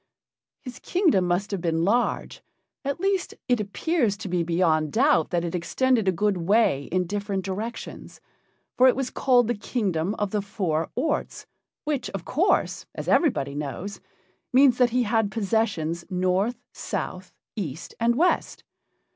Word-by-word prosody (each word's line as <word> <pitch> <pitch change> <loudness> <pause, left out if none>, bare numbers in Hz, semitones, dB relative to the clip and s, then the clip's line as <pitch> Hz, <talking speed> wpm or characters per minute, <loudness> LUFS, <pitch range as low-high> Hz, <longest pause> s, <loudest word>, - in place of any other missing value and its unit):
His 250 -3 -8
kingdom 325 - +2
must 180 +4 0
have 195 -3 -2
been 165 -1 0
large; 235 +5 0 0.4
at 280 +3 -2
least 385 -1 0
it 245 -2 +2
appears 215 - 0
to - - -7
be 180 -1 0
beyond 165 -3 +1
doubt 280 +6 +3
that 175 -1 0
it 170 - -4
extended 225 +5 +1
a - - +5
good 205 +2 0
way 175 -6 +2
in 180 +1 0
different 200 0 -3
directions, 215 +5 -6 0.6
for 255 - +6
it 255 - +5
was 265 -1 -2
called 245 -3 +3
the 240 - +1
Kingdom 200 -5 -1
of 205 -4 -2
the 210 - 0
Four 180 -6 -2
Orts, 295 +4 -2 0.4
which, 295 -4 -2
of 175 - -6
course, 335 +9 +1
as - - -6
everybody 140 - +2
knows, 150 +8 -5 0.5
means 260 -1 +5
that 250 -1 +5
he 250 +1 +1
had 225 -1 +1
possessions 200 -6 -1
north, 185 +5 0 0.2
south, 185 0 -5 0.2
east, 165 - -5
and 235 +1 +2
west. 345 +7 +1
205 Hz, 155 wpm, -25 LUFS, 180-245 Hz, 0.6 s, for